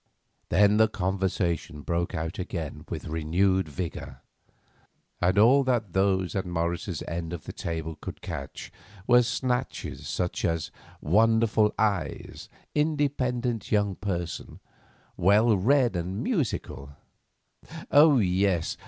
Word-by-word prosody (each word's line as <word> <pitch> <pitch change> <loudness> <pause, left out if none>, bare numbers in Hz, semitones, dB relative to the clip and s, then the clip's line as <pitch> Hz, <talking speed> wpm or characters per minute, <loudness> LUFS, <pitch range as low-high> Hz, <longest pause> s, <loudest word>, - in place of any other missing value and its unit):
Then 105 +4 +4
the 110 0 +5
conversation 90 -6 -2
broke 85 0 -2
out 80 +3 -4
again 85 -5 -5
with - - -5
renewed 85 +3 +1
vigour, 70 -4 -6 1.0
and 90 +2 +2
all 125 +7 +6
that 115 -8 0
those 95 -1 +1
at 95 - 0
Morris's 85 +1 -3
end 85 0 -4
of 85 - -6
the - - -8
table 80 -1 -4
could - - -7
catch 70 0 -7 0.3
were 125 +1 +6
snatches 125 +1 -3
such 90 -1 -2
as: 85 -2 -1 0.3
"Wonderful 110 +4 +3
eyes"; 100 -9 -2 0.2
"Independent 130 -7 -1
young 105 -2 +2
person"; 90 -3 -5 0.6
"Well 105 +5 +4
read 120 +3 +3
and 90 +3 -3
musical"; 125 - -3 1.0
"Oh, 145 -1 +7
yes! 95 -4 +1
95 Hz, 115 wpm, -27 LUFS, 85-115 Hz, 1.0 s, Oh